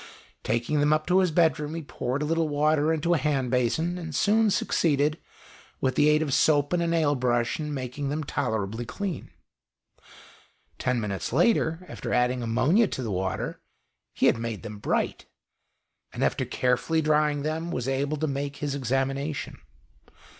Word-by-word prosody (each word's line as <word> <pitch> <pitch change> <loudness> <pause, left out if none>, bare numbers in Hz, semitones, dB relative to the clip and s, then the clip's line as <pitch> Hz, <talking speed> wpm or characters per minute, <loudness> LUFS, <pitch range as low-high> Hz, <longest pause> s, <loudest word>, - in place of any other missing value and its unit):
Taking 120 +6 0
them 145 +1 +3
up 155 0 +2
to 185 +1 +3
his 185 -1 +3
bedroom 160 -2 +1
he 165 - -5
poured 135 0 -3
a - - 0
little 165 0 0
water 150 +1 +2
into 160 +2 +1
a 165 - +2
hand 135 -3 0
basin, 160 +8 0
and 160 -4 -6
soon 215 +7 +3
succeeded, 150 -5 +1 0.6
with 130 - +1
the 150 - +4
aid 150 +1 +3
of 145 -4 -2
soap 145 +2 +3
and 175 - +2
a 170 - 0
nail 160 -3 +2
brush, 120 -1 0
in 150 -1 -3
making 135 +1 -4
them 155 +2 -2
tolerably 110 -6 -2
clean. 190 - -5 1.5
Ten 125 -2 0
minutes 100 -3 -3
later, 170 - +2
after - - -6
adding 125 0 +1
ammonia 130 - +3
to 130 - -4
the 110 - -3
water, 95 0 -3 0.5
he - - +1
had - - +4
made 115 -3 -4
them 105 -1 -7
bright, - - -1 0.8
and - - -3
after - - +1
carefully 125 +6 0
drying 150 -1 +2
them, 160 +2 -2
was 125 -7 -3
able 140 +3 -1
to 155 - -1
make 140 0 -3
his 145 -1 -3
examination. 135 +2 -2
145 Hz, 170 wpm, -26 LUFS, 125-160 Hz, 1.5 s, the